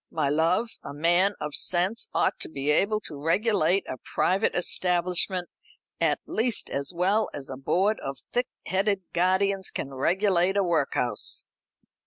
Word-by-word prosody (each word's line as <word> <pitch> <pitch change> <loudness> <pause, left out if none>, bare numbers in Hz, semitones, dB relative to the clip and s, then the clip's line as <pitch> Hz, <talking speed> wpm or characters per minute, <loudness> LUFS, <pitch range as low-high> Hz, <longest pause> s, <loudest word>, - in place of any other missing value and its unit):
"My 150 -3 -1
love, 165 +9 +2
a 140 - -8
man 175 +6 +3
of 150 -1 -5
sense 185 +9 +1
ought - - +1
to - - -1
be 145 -1 -1
able 210 +7 +2
to 145 -7 -7
regulate 195 +2 +2
a 130 - -6
private 190 - 0
establishment 180 +1 +1 0.5
at - - +2
least 235 +1 -1
as 140 +2 -2
well 190 +5 +1
as 135 -2 -7
a - - -4
board 190 +10 +1
of 135 0 -5
thick 245 +1 0 0.2
headed 195 +1 0
guardians 190 +2 +1
can 135 - -5
regulate 185 +6 +2
a 200 - +3
workhouse." 140 - -1
180 Hz, 150 wpm, -26 LUFS, 150-200 Hz, 0.5 s, man